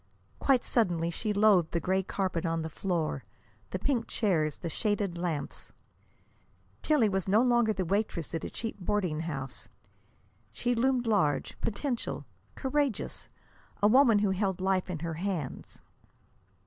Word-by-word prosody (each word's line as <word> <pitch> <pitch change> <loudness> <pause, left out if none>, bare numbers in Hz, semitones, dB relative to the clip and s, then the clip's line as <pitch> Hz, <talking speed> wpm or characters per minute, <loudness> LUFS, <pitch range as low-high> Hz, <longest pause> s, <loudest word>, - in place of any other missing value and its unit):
Quite 265 -3 +3
suddenly 175 -8 +1
she 215 +5 -2
loathed 200 -5 +4
the 170 - +2
gray 190 +2 +1
carpet 185 -3 -2
on 165 -1 -1
the 160 - -5
floor, 170 -2 -2 0.5
the - - -2
pink 245 -5 0
chairs, 160 -8 0
the 170 - -5
shaded 205 +1 -1
lamps. 170 -5 -4 1.1
Tillie 295 -8 +3
was 195 -2 -1
no 210 +5 +4
longer 240 -3 +3
the 190 -3 -1
waitress 195 -4 -1
at 165 - -2
a - - -3
cheap 225 -2 -5
boarding 180 -4 0
house. 135 -6 -5 0.8
She 245 0 0
loomed 250 +1 +2
large, 175 -11 +1
potential, 240 +3 -2 0.3
courageous, 270 -5 -1 0.5
a - - +8
woman 240 -1 +6
who 205 -1 +2
held 190 -1 0
life 190 0 +1
in 180 - -2
her 165 - -2
hands. 180 -9 -4
195 Hz, 145 wpm, -30 LUFS, 170-225 Hz, 1.1 s, a